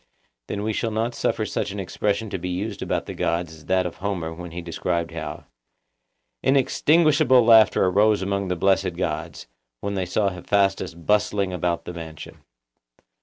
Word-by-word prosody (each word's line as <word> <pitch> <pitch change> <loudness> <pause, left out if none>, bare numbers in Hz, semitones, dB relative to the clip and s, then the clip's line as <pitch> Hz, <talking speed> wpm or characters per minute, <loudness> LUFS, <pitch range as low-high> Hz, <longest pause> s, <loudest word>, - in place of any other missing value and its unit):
Then 100 - -3
we 110 +1 -1
shall 115 - -1
not 110 +2 -1
suffer - - -1
such - - -2
an 100 +1 -5
expression 100 +3 -2
to - - -3
be 90 - -4
used 100 +4 -4
about - - -1
the - - -6
gods 85 -1 -1
as 80 -1 -15
that 95 -1 +2
of 90 - -5
Homer 90 -5 -3
when 90 +1 -8
he 85 +2 -7
describes 85 0 -2
how - - -6 1.0
'Inextinguishable 140 -1 +4
laughter 110 -4 +6
arose 100 +2 +3
among 100 0 -1
the 90 - -1
blessed 95 0 +1
gods, 80 -2 -4 0.3
when 100 - -3
they 95 -2 -2
saw 100 +2 +1
Hephaestus 95 -1 0
bustling 100 +2 0
about 85 -1 -1
the 90 - -6
mansion. 80 -3 -9
95 Hz, 170 wpm, -24 LUFS, 85-105 Hz, 1.0 s, laughter